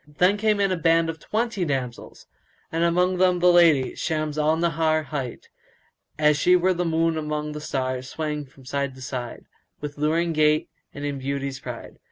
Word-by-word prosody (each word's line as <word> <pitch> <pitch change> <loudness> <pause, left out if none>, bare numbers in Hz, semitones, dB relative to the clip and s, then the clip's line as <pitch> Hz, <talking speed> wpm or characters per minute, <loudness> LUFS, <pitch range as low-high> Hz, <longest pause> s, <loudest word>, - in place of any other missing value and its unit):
Then 180 +2 +5
in 205 - -3
came 210 -1 +1
a 195 -2 +2
band 165 0 +2
of 160 - -13
twenty 220 +1 -2
damsels 130 -6 -4 0.5
and 165 +1 0
amongst 180 +2 +2
them 180 -1 +4
the 180 0 +5
lady, 165 -7 +5
Shams 155 -2 -2
al 155 +1 +2
Nahar 160 -1 +1
hight, 130 -3 -5 0.7
as 150 -1 +4
she 180 +4 +4
were 185 +1 +3
the 180 0 -1
moon 165 0 +1
among 150 0 -3
the 150 0 -6
stars 130 -3 -3
swaying 150 -2 -4
from 130 0 -19
side 140 0 -2
to 130 - -13
side, 125 -1 -6 0.3
with 145 0 -7
luring 165 +3 +1
gait 155 0 +2 0.2
and 145 +1 -6
in 140 -1 -3
beauty's 140 0 -3
pride. - - -9
155 Hz, 185 wpm, -24 LUFS, 140-170 Hz, 0.7 s, Then